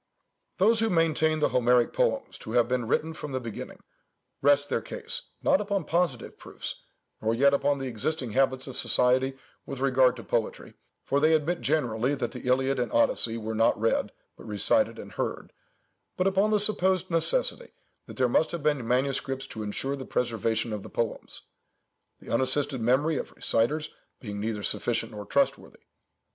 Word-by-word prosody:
"Those 220 +4 +4
who 225 0 +1
maintain 160 -3 +2
the - - +3
Homeric 125 -1 +3
poems - - -1
to 110 - -8
have 120 -1 +3
been 125 -2 -1
written 160 +7 0
from 150 -3 -7
the 130 - -1
beginning, 115 -4 -8 0.6
rest 145 +1 +4
their - - -1
case, - - -6 0.2
not 195 - +3
upon 200 -3 -1
positive 165 -7 -1
proofs, - - -7 0.4
nor 110 +1 +1
yet 140 +3 +4
upon 140 0 +2
the 135 - -5
existing 125 +2 -2
habits 130 +1 +1
of 130 - -8
society 130 +2 +2 0.3
with 135 - -7
regard 130 -2 +3
to 115 - -9
poetry—for 120 +4 -3
they 155 +2 +4
admit 165 +3 -1
generally 130 -3 0
that - - -3
the 125 - -7
Iliad 130 +1 +2
and 120 -3 -1
Odyssey 115 0 +2
were 110 0 -4
not 115 0 +2
read, 115 +1 0 0.2
but - - -13
recited 105 -2 +1
and - - -9
heard,—but 185 - -7
upon 195 +2 +2
the 215 -1 +3
supposed 190 -3 +2
necessity - - +2 0.4
that - - -11
there 130 -1 +3
must 155 +6 +2
have 170 -4 -4
been 145 -6 0
manuscripts 135 +1 -1
to 110 - -5
ensure 120 +6 -2
the 135 - -7
preservation 115 -2 -1
of 105 - -4
the - - -10
poems—the 115 -2 -8
unassisted 130 +2 +1
memory 135 +7 +2
of - - -5
reciters 150 +7 0 0.3
being 105 -4 -6
neither 105 -1 -3
sufficient - - 0
nor 105 -1 -8
trustworthy. - - -1
135 Hz, 165 wpm, -27 LUFS, 115-155 Hz, 0.6 s, Those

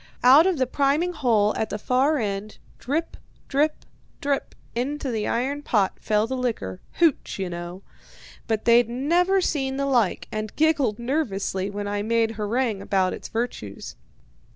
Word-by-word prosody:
Out 275 +8 +8
of 370 -4 +1
the 260 - +2
priming 285 +7 +1
hole 225 -9 +2
at 220 - -1
the - - -3
far 260 +7 +2
end, 205 -2 -3 0.2
drip, 305 +6 -2 0.3
drip, 295 +3 0 0.3
drip 280 -1 -2 0.2
into 270 +3 -2
the 220 -2 -2
iron 270 +5 -1
pot 205 -9 +1
fell 210 0 +1
the 260 +3 -3
liquor 225 - -3
HOOCH, 330 -5 +1
you 190 -2 -3
know. 175 +2 -7 0.6
But 220 -2 -1
they'd 235 0 +5
never 345 +10 +2
seen 270 -6 -1
the 275 - 0
like, 245 -8 +1
and 215 -1 -4
giggled 290 -8 +2
nervously 215 -7 -1
when 205 0 -4
I 205 0 -1
made 225 +1 +1
harangue 220 0 -1
about 190 -2 +1
its - - -7
virtues. 225 - -5
240 Hz, 155 wpm, -24 LUFS, 210-280 Hz, 0.6 s, Out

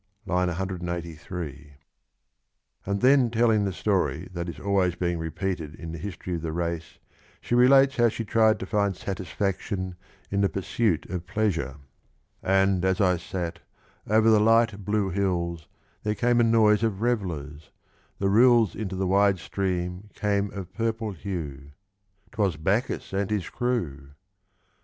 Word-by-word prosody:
(IV. 95 - -4
183) 85 -4 -5 1.1
And 100 0 -1
then 130 -1 +5
telling 110 -2 +3
the 100 - -1
story 90 -5 0
that 85 0 -4
is 85 - -8
always 95 -3 +1
being 85 -2 -1
repeated 80 -1 -3
in 80 -1 -7
the 80 - -6
history 90 0 -5
of 85 - -2
the 80 -1 -3
race, 85 0 -3 0.4
she - - -4
relates 135 +2 +6
how 120 -1 +5
she 115 +1 -5
tried 110 0 +3
to - - -4
find 100 -1 0
satisfaction 95 0 -3 0.4
in 100 0 +1
the 100 - +3
pursuit 95 -1 0
of 90 -1 -4
pleasure: 90 - -1 0.7
And 95 -1 +2
as 95 +2 +1
I 90 -3 +3
sat, 85 0 -5 0.5
over 110 +1 +4
the 110 - +6
light 110 -1 +3
blue 105 -1 0
hills 85 -4 -1 0.3
There 105 0 -1
came 120 +1 +2
a - - +5
noise 110 -2 +4
of 110 -3 -1
revellers: 80 -11 -2 0.5
the 100 - 0
rills 115 -2 +5
Into 100 -2 -4
the 95 +1 -1
wide 100 +1 +3
stream 90 +1 -3
came 100 -1 0
of 95 -2 -8
purple 115 0 -2
hue 75 -7 -6 0.3
— 100 0 -38
'Twas 95 -7 0
Bacchus 100 +7 -1
and 100 0 0
his 105 -4 -1
crew! 80 - -2
95 Hz, 150 wpm, -26 LUFS, 85-105 Hz, 1.1 s, relates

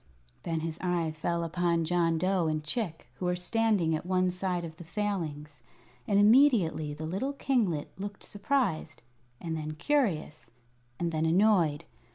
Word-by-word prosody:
Then 165 -1 -2
his 165 0 -3
eye 175 -3 0
fell 170 +2 -2
upon 170 0 0
John 165 -1 +2
Dough 185 -1 +1
and 155 -1 -1
Chick, 165 +1 -2
who 185 - -6
were 180 0 +1
standing 180 -2 +1
at 155 - -4
one 185 0 +1
side 180 -1 -2
of 160 -1 -9
the 175 - -9
Failings, 160 - -4 0.5
and 200 - +2
immediately 210 - +4
the 155 +1 -6
little 195 - -2
kinglet 225 - 0
looked 200 0 -6
surprised, 200 - -1 0.4
and 165 -1 -4
then 155 -1 -4
curious, 170 - -1 0.5
and 170 -1 -1
then 160 0 0
annoyed. 175 -4 +3
175 Hz, 155 wpm, -29 LUFS, 160-200 Hz, 0.5 s, immediately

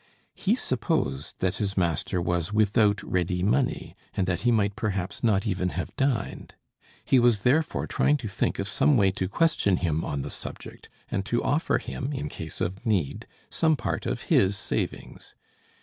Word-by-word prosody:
He - - +1
supposed 70 +3 -2
that 95 +2 0
his 100 -2 -2
master 85 0 0
was 85 +1 -1
without 105 0 +3
ready 90 0 -1
money, 120 +6 0 0.2
and 95 -3 +1
that 90 -2 0
he 120 - +3
might 100 -3 +2
perhaps 95 -4 -3
not 105 -3 +2
even 90 -3 0
have 95 - -4
dined. 135 -4 -1 0.5
He 130 - +5
was 120 -4 +4
therefore 150 +8 +2
trying 150 - +2
to 125 - -6
think 100 +2 -1
of 100 - -2
some 135 +7 +3
way 95 -3 +4
to 95 -1 -3
question 100 - +2
him 80 -3 0
on 70 -1 -3
the - - -6
subject, - - -9 0.2
and 95 - 0
to 120 +1 0
offer 155 +3 +1
him, 135 0 -5
in 145 +2 -3
case 80 - -7
of 95 +5 -2
need, 100 - -1 0.2
some 160 -1 +3
part 120 - -3
of - - -2
his 100 0 +3
savings. - - -4
100 Hz, 175 wpm, -26 LUFS, 90-120 Hz, 0.5 s, He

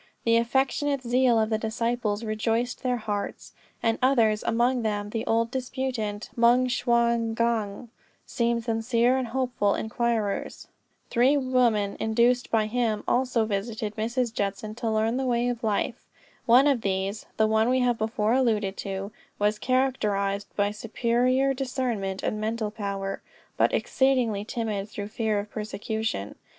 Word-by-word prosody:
The 230 0 +4
affectionate 270 +3 0
zeal 245 0 +3
of 220 0 0
the 220 - +1
disciples 230 -1 -1
rejoiced 225 +2 -1
their 250 -2 0
hearts; 210 -3 -4 0.3
and 225 -1 +1
others, 230 -5 +3
and - - -2
among 240 +2 +2
them 210 -2 -2
the 225 0 -2
old 230 +1 +1
disputant, 250 -5 -3
Moung 240 +2 +4
Shwa 235 -1 +2 0.2
gnong, 230 -1 -1 0.4
seemed 235 -2 0
sincere 230 +2 +2
and 260 -2 -1
hopeful 240 -4 0
inquirers. 220 -2 -2 0.4
Three 260 +4 +4
women, 245 -6 +1
induced 235 +3 +2
by 220 -2 +2
him, 220 -1 -1
also 245 -3 +2
visited 215 +1 -3
Mrs. 235 +2 -1
Judson 205 0 -3
to 230 0 -3
learn 220 +2 +1
the 265 0 -1
way 240 0 +1
of 240 -1 -4
life. 220 +3 -1 0.4
One 245 +4 +7
of 275 -5 +2
these 195 +1 -2
(the 220 - +4
one 220 +2 +2
we 255 0 +2
have 245 -2 +1
before 220 0 0
alluded 220 -6 +1
to) 195 +1 -4 0.3
was 210 +1 +1
characterized 205 -6 0
by 205 0 +1
superior 245 +5 +1
discernment 245 -7 -2
and 215 - -2
mental 220 -1 -2
power, 200 -2 -4 0.3
but - - +3
exceedingly 245 -6 +1
timid 215 -4 -3
through 205 0 -6
fear 220 -1 -1
of 205 +1 -4
persecution. 215 - -3
230 Hz, 145 wpm, -26 LUFS, 210-245 Hz, 0.4 s, One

